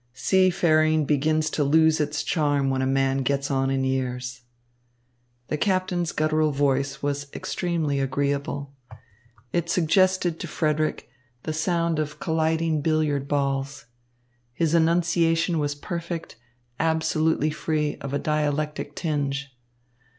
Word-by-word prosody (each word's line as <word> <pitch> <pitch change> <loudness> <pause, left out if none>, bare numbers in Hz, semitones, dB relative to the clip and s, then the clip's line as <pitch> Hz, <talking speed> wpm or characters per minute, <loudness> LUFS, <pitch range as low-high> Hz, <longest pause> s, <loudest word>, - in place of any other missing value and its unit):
Seafaring 155 -2 +3
begins 155 +2 +1
to 150 - 0
lose 160 +2 +4
its 150 0 -1
charms 145 -4 +1
when 130 0 0
a 130 - +1
man 135 0 +1
gets 140 +1 -1
on 135 0 +1
in 135 0 0
years." 130 -1 -2 1.1
The 150 - -1
captain's 185 -3 0
guttural 155 0 +1
voice 140 -1 0
was 140 0 -2
extremely 165 -6 -1
agreeable. 140 +1 -2 0.8
It 170 -1 0
suggested 180 0 +2
to 170 - -5
Frederick 155 -3 -1 0.4
the 155 - -3
sound 170 0 0
of 150 0 -3
colliding 160 -1 0
billiard 150 -3 0
balls. 140 -1 -1 0.7
His 165 +3 0
enunciation 165 0 +2
was 145 -1 -1
perfect, 170 +2 -5 0.4
absolutely 160 -1 +1
free 150 -1 -1
of 140 - -6
a 140 - 0
dialectic 150 0 -1
tinge. 140 -4 -2
155 Hz, 120 wpm, -25 LUFS, 140-160 Hz, 1.1 s, lose